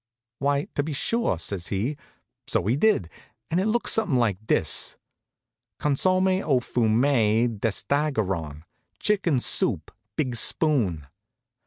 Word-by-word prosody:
"Why, 140 +1 +1
to - - 0
be 150 +1 -4
sure," 230 - 0
says 90 +1 -4
he. 110 +9 -2 0.5
So - - 0
he 115 +5 +2
did, 145 - +2 0.4
and 170 - +2
it 195 - 0
looked 235 +2 +1
something 205 -12 +1
like 110 -3 -1
this: - - +2 0.8
"Consomme 185 +6 +1
au 135 -5 +2
fumet 115 -2 +1
d'estaragon 100 - -1 0.3
(chicken 190 -10 +1
soup 90 -9 0 0.2
big 130 -5 -1
spoon). 110 - +1
125 Hz, 120 wpm, -25 LUFS, 105-155 Hz, 0.8 s, he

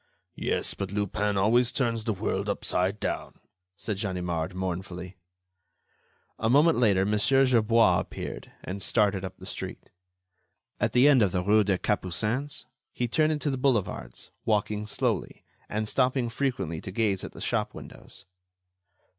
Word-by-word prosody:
"Yes, - - 0
but 100 -1 -5
Lupin 105 0 -1
always 115 +5 +3
turns 115 -3 -1
the 110 - +1
world 100 0 -2
upside 100 0 0
down," - - -3 0.4
said 105 -3 -4
Ganimard, 90 -3 -2
mournfully. 90 0 -4 1.2
A 110 - +1
moment 150 +3 +5
later, 100 -5 +4
Mon. 105 +1 +1
Gerbois 115 -3 +4
appeared, - - -6
and 95 +2 -5
started 100 -4 +2
up 95 0 -6
the - - -11
street. - - -6 0.9
At - - 0
the 125 +3 +6
end 140 -4 +6
of 100 -4 +3
the 90 -1 0
rue 105 +2 +4
des 95 -2 +1
Capucines, 105 +9 -1 0.3
he 120 - -2
turned 155 +6 +2
into 150 -1 -1
the 130 - -3
boulevards, 105 - -1
walking 105 -1 0
slowly, - - -2 0.3
and 110 +1 -2
stopping 125 0 +1
frequently 115 - -2
to 95 - -7
gaze 100 -2 0
at - - -7
the - - -11
shop - - -1
windows. - - -10
105 Hz, 145 wpm, -27 LUFS, 95-120 Hz, 1.2 s, the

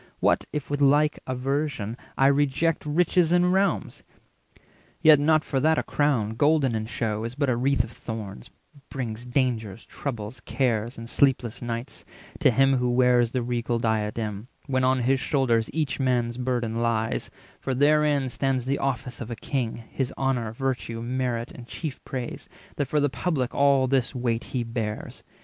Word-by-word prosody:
What - - +2
if 150 -1 -4
with 145 0 -1
like 145 +2 +4
aversion 130 -3 -2 0.2
I 135 - +4
reject 145 +3 +2
Riches 170 +2 +2
and 180 +1 +4
realms! 195 +1 0 1.0
Yet 155 -3 +7
not 155 +1 +3
for 135 - -1
that 160 +3 +3
a - - +1
crown, 135 -8 +1
Golden 145 +1 +3
in 110 -1 -2
shew, 110 -3 -2
is 115 +2 -5
but 140 -1 0
a - - +1
wreath 130 0 +2
of 115 - -9
thorns, 105 - -7 0.4
Brings 120 -2 -5
dangers, 115 -5 -1
troubles, 115 -3 -5
cares, 115 -1 -1
and 115 0 -7
sleepless 125 -2 +1
nights, 120 +1 -5 0.4
460 - - +6
To - - +3
him 135 0 +4
who 125 0 +1
wears 120 -1 +4
the 125 0 -2
regal 120 0 -1
diadem, 110 -1 -2 0.2
When 130 -2 0
on 130 0 +3
his 135 +2 +2
shoulders 120 -6 +1
each 150 -4 -1
man's 120 -3 +1
burden 120 -2 -1
lies; 115 -1 0 0.3
For 130 - -2
therein 145 -1 +3
stands 130 -1 -1
the 140 +2 0
office 125 -2 -3
of 120 - -5
a 120 - -4
king, 120 -2 -3
His 135 -1 -2
honour, 125 -5 0
virtue, 120 -2 -3
merit, 120 -1 -2
and 120 -1 -11
chief 150 -1 -6
praise, 125 -3 -6 0.3
That 145 - 0
for 150 - +1
the 145 - +3
public 135 -4 -1
all 140 -1 +4
this 130 0 +1
weight 120 -2 -1
he 125 -2 -2
bears. 115 -2 -5
130 Hz, 170 wpm, -26 LUFS, 115-140 Hz, 1.0 s, Yet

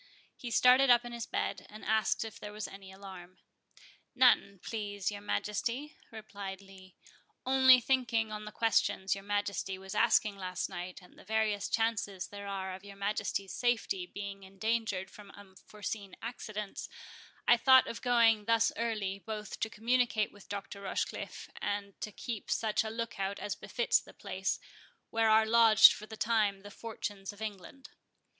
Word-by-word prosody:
He 245 - -7
started 250 +3 +6
up 240 0 +6
in 240 - -6
his 235 -1 -5
bed, - - -3
and 215 +1 -11
asked 220 0 +1
if 220 - -9
there 210 - -7
was 210 0 -5
any 195 -1 -11
alarm. 190 -2 -11 0.8
"None, 240 -6 +4
please 205 -3 -3
your 205 0 -7
Majesty," 235 +8 -2
replied 205 -3 -7
Lee; 190 -1 -15 0.5
"only, 260 -1 +7
thinking 235 -3 +1
on 210 0 -5
the 215 - -7
questions 205 -3 +1
your 195 0 -7
Majesty 205 -1 -2
was 190 0 -8
asking 215 -3 +3
last 185 -1 -3
night, 180 +2 -7
and 180 - -18
the - - -14
various 215 -1 0
chances 225 -4 0
there 200 0 -8
are 190 -1 -4
of 190 +1 -9
your 200 -1 -11
Majesty's 200 -1 -2
safety 225 -7 0
being 200 0 -7
endangered 195 0 -2
from 205 -1 -13
unforeseen 205 +1 -8
accidents, 215 -3 -6 0.6
I 240 - +8
thought 260 +2 +6
of 225 - -6
going 230 -4 +4
thus 230 0 +3
early, 210 -4 -2
both 215 0 -6
to 220 - -1
communicate 230 -1 +1
with 205 - -17
Dr. 200 0 -6
Rochecliffe, 195 - -4
and 200 -1 -2
to 215 - -4
keep 220 0 -6
such 220 -1 +1
a 220 - -4
look 230 -2 -5
out 195 +1 -2
as 205 - -3
befits 485 +1 +1
the - - -16
place, - - -2 0.5
where 225 -1 +3
are 220 0 +6
lodged 225 -1 +8
for 215 - -9
the 220 - -9
time 210 -4 +1
the 205 +1 -11
Fortunes 205 -3 -6
of 205 - -16
England. 220 +5 -7
210 Hz, 165 wpm, -32 LUFS, 195-230 Hz, 0.8 s, I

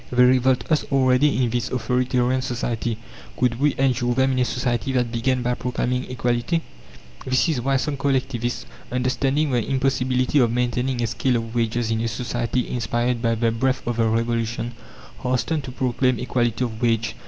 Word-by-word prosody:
They 125 0 +5
revolt 130 0 +3
us 155 - +3
already 130 0 +3
in 120 - 0
this 120 -1 -1
authoritarian 125 +1 +1
society. 120 -2 -2 0.4
Could 120 -1 +1
we 145 0 +2
endure 125 -2 +1
them 130 +1 +3
in 130 - 0
a 125 - +3
society 125 +1 -1
that 125 -2 +1
began 125 +2 0
by 125 0 +1
proclaiming 125 +1 -2
equality? 125 +6 0 0.6
This 130 +4 +2
is 140 -6 0
why 135 +2 +2
some 140 +2 -2
collectivists, 125 -3 -1 0.3
understanding 135 +4 0
the 120 -3 +1
impossibility 130 0 +1
of 120 -3 +3
maintaining 125 +1 0
a - - +2
scale 125 +3 0
of 115 -1 -3
wages 115 -1 0
in 110 0 0
a 115 - 0
society 120 +2 -2
inspired 120 0 -1
by 115 -1 +1
the 115 0 +1
breath 130 +3 0
of 120 -1 -2
the 115 -1 +3
Revolution, 115 +1 -1 0.5
hasten 130 +5 0
to 135 -2 -7
proclaim 130 0 +1
equality 120 -1 0
of 115 -2 -4
wage. 115 -2 +1
125 Hz, 175 wpm, -23 LUFS, 120-130 Hz, 0.6 s, They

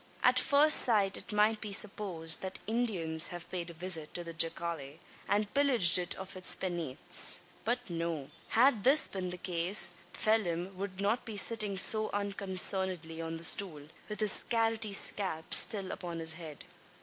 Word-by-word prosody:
At 255 0 +3
first 290 +4 +4
sight 205 -6 +3
it - - -7
might 210 +1 0
be 210 - -7
supposed 195 -6 +1
that 190 0 -6
Indians 195 -9 0
have 175 -2 -9
paid 175 -2 -6
a - - -11
visit 165 -2 0
to 175 - -4
the 170 -1 -9
jacale, 165 -3 -1 0.3
and 205 0 -2
pillaged 245 -11 +5
it 175 - -4
of 190 0 -10
its 185 0 +1
penates. 170 -8 -1 0.2
But 245 +2 -3
no. 165 -5 -6 0.2
Had 235 -3 +1
this 280 +4 +4
been 185 -2 -6
the 180 - -7
case, 175 +3 -2
Phelim 190 -4 -2
would 190 0 -7
not 210 +4 -1
be 220 -3 -9
sitting 210 -1 +1
so 215 +3 +2
unconcernedly 190 -4 -1
on 165 0 -6
the 165 - -11
stool, 160 -5 +2 0.2
with 210 +1 -5
his 210 -2 +6
carroty 225 -2 -1
scalp 185 -6 -1
still 195 -3 +1
upon 170 -2 -7
his 160 -1 +5
head. 160 -3 -11
190 Hz, 165 wpm, -30 LUFS, 170-215 Hz, 0.3 s, his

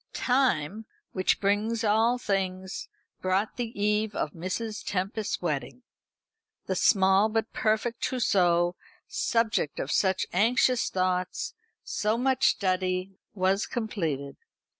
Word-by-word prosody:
Time, 220 - +1 0.2
which 185 -1 +1
brings 210 +3 0
all 225 +3 +3
things, 190 -4 -3 0.3
brought 190 +3 0
the 240 -2 -1
eve 210 +1 +1
of 150 - -1
Mrs. 185 +6 -4
Tempest's 200 +3 -2
wedding. 160 - -3 0.8
The - - -1
small 195 0 +4
but 225 0 -2
perfect 220 +2 0
trousseau, 175 -8 +2 0.3
subject 225 -10 0
of 135 - -3
such 190 -1 +2
anxious 235 +5 +3
thoughts, 185 -1 -1 0.3
so 215 +2 0
much 260 +1 +2
study, 185 -1 0 0.2
was 190 +1 +1
completed. 160 - -3
200 Hz, 110 wpm, -27 LUFS, 185-225 Hz, 0.8 s, small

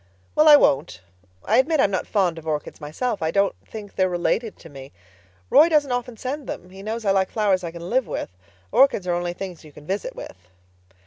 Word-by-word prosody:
"Well, 305 +1 +4
I 300 - +10
won't. 135 - +2 0.5
I 225 +5 +3
admit 310 +3 +2
I'm 200 - +3
not 190 - -2
fond 180 -6 0
of 160 - -13
orchids 150 0 -4
myself. 200 +10 -3
I 160 - 0
don't 200 +3 +2
think 210 -2 -10
they're 185 -1 +1
related 180 +5 -1
to - - -14
me. 135 -3 -11 0.6
Roy 320 - +7
doesn't 295 -4 +2
often 245 -1 -3
send 270 +4 -5
them—he 185 +2 -8
knows 220 +2 -4
I 195 - +3
like 190 -1 +2
flowers 200 -4 +1
I 170 - -3
can 170 +1 -9
live 255 +4 +1
with. - - -4 0.4
Orchids 270 -8 +4
are 175 - 0
only 175 0 -2
things 180 -2 -8
you 155 - -14
can 145 +1 -15
visit 195 +5 -3
with." 90 -1 -11
195 Hz, 210 wpm, -23 LUFS, 170-240 Hz, 0.6 s, I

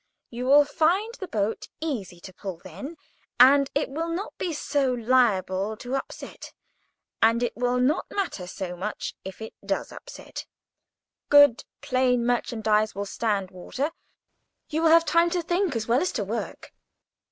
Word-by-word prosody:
You 245 +2 -4
will 290 +2 +7
find 345 +10 +1
the 380 - -5
boat 215 -3 -2
easier 220 - -4
to 185 - -11
pull 190 -2 -6
then, 200 - -8 0.4
and 275 +2 +7
it 290 - +1
will 320 +5 -3
not 350 +5 -4
be 355 - -1
so 285 -3 0
liable 220 -4 +1
to 245 +3 -7
upset, 270 - -7 0.7
and 230 +2 +4
it 240 - -2
will 245 +1 0
not 265 +7 +1
matter 360 - -3
so 180 0 -5
much 200 +4 -4
if 190 +3 -8
it 220 - -8
does 195 0 -2
upset; - - -9 0.8
good, 285 -5 +6 0.2
plain 255 -3 +1
merchandise 220 -3 +1
will 200 +1 -3
stand 200 -2 -2
water. 260 - -4 0.8
You 315 +1 -1
will 330 - +4
have 330 +1 +6
time 335 +1 +3
to 350 0 -1
think 350 -3 0
as 220 -1 -2
well 240 +4 +3
as 365 - 0
to 220 - -1
work. 220 +4 -5
250 Hz, 160 wpm, -26 LUFS, 210-300 Hz, 0.8 s, will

